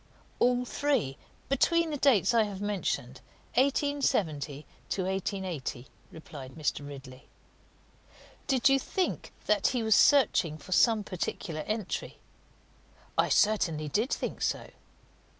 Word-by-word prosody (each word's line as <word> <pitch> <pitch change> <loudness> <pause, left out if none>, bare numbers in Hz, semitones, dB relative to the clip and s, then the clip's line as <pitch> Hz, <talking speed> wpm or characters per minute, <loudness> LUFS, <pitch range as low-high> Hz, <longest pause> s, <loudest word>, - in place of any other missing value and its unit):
"All 245 0 +3
three, 255 - 0 0.3
between 330 +4 +2
the - - -1
dates 240 -7 +4
I 230 - +5
have 200 -2 -6
mentioned 185 -11 -3 0.3
1870 225 - 0 0.2
to 190 - -1
1880," 185 - -3 0.3
replied 140 -4 -10
Mr. 150 -2 -2
Ridley. 135 -2 -11 1.2
"Did 260 -4 +3
you 270 0 +5
think 370 +7 -2
that 210 -2 +3
he 245 -3 0
was 220 -1 +4
searching 200 - +4
for 160 +5 -13
some 220 +2 +4
particular 175 -3 -4
entry?" 215 -3 -3 1.0
"I - - +2
certainly 165 -8 +2
did 220 - 0
think - - -3
so." - - -2
200 Hz, 115 wpm, -29 LUFS, 155-250 Hz, 1.2 s, I